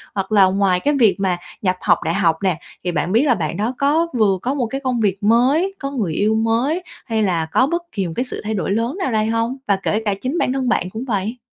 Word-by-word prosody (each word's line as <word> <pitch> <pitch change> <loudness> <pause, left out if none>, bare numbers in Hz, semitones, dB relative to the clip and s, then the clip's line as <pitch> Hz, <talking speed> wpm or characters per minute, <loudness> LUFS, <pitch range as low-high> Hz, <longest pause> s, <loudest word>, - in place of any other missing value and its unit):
hoặc 195 +1 -3
là 200 -3 +6
ngoài 190 -1 +2
cái 290 +9 +1
việc 220 -5 +5
mà 185 -2 +1 0.2
nhập 185 -2 +1
học - - +3
đại 165 - 0
học 170 -4 +2
nè, 180 -4 +1 0.2
thì 180 - -1
bạn 175 +1 -1
biết 230 +6 +4
là 265 -5 +3
bạn 160 -6 -3
đó 220 +5 -1
có 305 +4 +2
vừa 210 -5 +2
có 255 - -1
một 270 -4 -1
cái 270 +4 -4
công 255 -2 0
việc 200 -2 0
mới, 260 - +3
có 275 -1 -4
người 215 - -2
yêu 210 +6 +1
mới, 235 +10 0 0.2
hay 225 -3 0
là 170 -5 +1
có 255 +11 +2
bất 340 +3 -1
kỳ 195 - -2
một 165 - -6
cái 245 - -1
sự - - -5
thay 215 +1 -2
đổi 195 -2 -2
lớn 230 - -1
nào 370 -10 -1
đây 215 -1 +1
hông? 230 +3 -1
Và 200 - +3
kể 215 - 0
cả 205 - +1
chính 265 +6 -2
bản 255 - +1
thân 265 -2 -1
bạn 180 -7 0
cũng 220 +6 -6
vậy. 220 +1 -2
220 Hz, 270 wpm, -20 LUFS, 195-260 Hz, 0.2 s, là